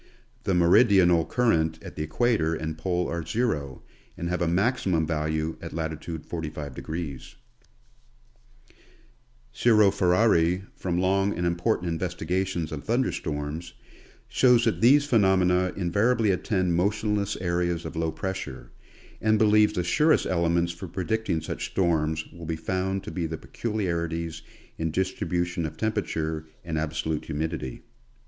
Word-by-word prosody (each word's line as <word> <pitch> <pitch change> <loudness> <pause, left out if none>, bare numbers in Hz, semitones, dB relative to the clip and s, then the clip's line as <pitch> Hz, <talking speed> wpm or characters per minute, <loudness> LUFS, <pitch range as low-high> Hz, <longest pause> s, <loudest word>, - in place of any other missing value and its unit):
The 95 - +1
meridional 90 -1 +5
current 80 -10 +1
at - - -9
the - - -4
equator 85 0 +1
and 80 0 -4
pole 90 +2 -1
are 85 0 -3
zero, 80 - -2 0.3
and 85 - -3
have 90 0 -1
a 85 - +2
maximum 95 -3 +1
value 80 0 -1
at - - -7
latitude 80 0 -5
45°. 75 -2 -6 2.2
Giro 110 -4 +5
Ferari, 90 -2 +3
from 85 -2 -2
long 95 0 +1
and 85 - -1
important 85 +1 0
investigations 90 0 -2
of 75 -2 -5
thun 120 +4 +1
der - - -1
storms, 75 +2 -5 0.5
shows 125 -2 +4
that 115 - 0
these 140 +5 +6
phenomena 95 -6 +3
invariably 100 +5 +2
attend 95 -1 0
motion 105 +4 +1
less 100 0 -1
areas 85 -1 -1
of - - -6
low 80 0 0
pressure, 80 -9 -5 0.5
and 110 0 +3
believes 105 0 +4
the 90 - -1
surest 150 - +3
elements 85 -1 +1
for 85 - -8
predicting 95 -2 -1
such - - -4
storms 80 -3 0
will 85 -1 -9
be 80 - -1
found 95 +4 -2
to - - -7
be 85 -3 -2
the 80 0 -5
peculiarities 85 -8 -3 0.4
in 80 0 0
distribution 90 -1 -1
of 80 0 -5
temperature 80 -7 -2 0.2
and 80 -2 -2
absolute 80 0 -2
humidity. 80 -4 -4
85 Hz, 135 wpm, -26 LUFS, 80-95 Hz, 2.2 s, these